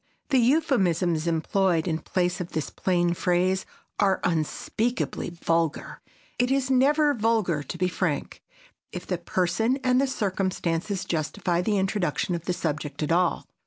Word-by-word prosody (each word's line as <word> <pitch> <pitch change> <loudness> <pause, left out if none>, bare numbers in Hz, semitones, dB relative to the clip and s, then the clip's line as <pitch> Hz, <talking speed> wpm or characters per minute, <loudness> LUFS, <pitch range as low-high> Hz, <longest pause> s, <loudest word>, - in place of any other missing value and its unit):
The 265 - +4
euphemisms 190 - +2
employed 170 +1 +1
in 160 -2 0
place 180 0 -1
of 175 - -7
this 155 -3 -2
plain 175 -2 +1
phrase 185 +2 +1 0.3
are 195 -2 +3
unspeakably 175 +10 -1
vulgar. 165 -2 -1 0.4
It 245 0 +2
is 270 -1 +1
never 290 +3 +4
vulgar 215 - +1
to 145 +5 -7
be 180 +1 +1
frank 180 - -2 0.5
if - - -6
the 180 -2 -2
person 190 +8 0
and 255 0 +3
the 275 - +2
circumstances 190 -5 -1
justify 175 +2 -1
the 205 +3 +1
introduction 190 -2 0
of 170 -1 -4
the 180 - 0
subject 150 -3 -3
at 150 - -1
all. 175 +1 +2
180 Hz, 145 wpm, -26 LUFS, 170-220 Hz, 0.5 s, The